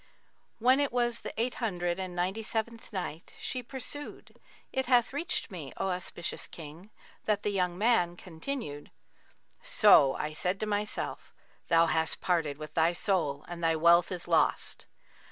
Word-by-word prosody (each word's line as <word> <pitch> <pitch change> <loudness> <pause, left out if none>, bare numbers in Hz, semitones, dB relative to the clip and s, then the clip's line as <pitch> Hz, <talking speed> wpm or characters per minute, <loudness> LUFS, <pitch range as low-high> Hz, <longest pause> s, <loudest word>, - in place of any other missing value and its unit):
When 255 +4 +4
it 285 -1 +1
was 240 -1 0
the - - -6
Eight 240 +2 +1
Hundred 175 -5 -1
and 185 -2 -4
Ninety 185 +5 -1
seventh 225 +1 -4
Night, 175 -5 -5
She 255 - -3
pursued, 270 +4 -6 0.3
It 265 -1 0
hath 245 -1 +4
reached 340 -1 -1
me, 160 -7 -7
O 195 - -1
auspicious 180 -1 -3
King, 165 +5 -10 0.4
that 210 -1 +1
the 210 - 0
young 180 -3 0
man 185 -5 +2
continued, 165 - -5 0.7
"So 135 -1 +6
I 150 +1 -3
said 180 +5 -1
to - - +1
myself, 210 0 -3 0.3
'Thou 165 0 +5
hast 160 0 +1
parted 165 -6 0
with 155 0 -8
thy 165 +1 +3
soul 165 -7 0
and 170 -1 -7
thy 165 0 +3
wealth 170 +2 +5
is 180 -2 -4
lost.' 165 -2 +1
180 Hz, 155 wpm, -30 LUFS, 165-230 Hz, 0.7 s, So